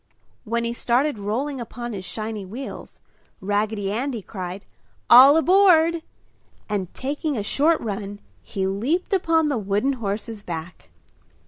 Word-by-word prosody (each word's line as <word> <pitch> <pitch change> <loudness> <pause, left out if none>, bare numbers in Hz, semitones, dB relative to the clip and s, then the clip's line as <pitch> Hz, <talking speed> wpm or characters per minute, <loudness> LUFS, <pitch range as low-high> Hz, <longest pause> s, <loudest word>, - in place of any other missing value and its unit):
When 235 +1 -1
he 235 0 -2
started 245 +2 0
rolling 250 +7 -2
upon 240 0 -6
his 190 -2 -6
shiny 215 -1 -5
wheels, 235 +9 -8 0.4
Raggedy 205 0 -1
Andy 235 0 -3
cried, 185 -1 -7 0.5
"All 270 +5 +9
aboard!" 335 -2 +4 0.7
and, 195 -4 -3
taking 290 +1 -2
a 210 - -2
short 305 +9 +2
run, 205 -2 -5 0.2
he 190 -1 -3
leaped 245 - -1
upon 325 -4 +2
the 270 -5 0
wooden 205 +7 0
horse's 220 -1 -4
back. 165 - -7
230 Hz, 130 wpm, -23 LUFS, 205-285 Hz, 0.7 s, All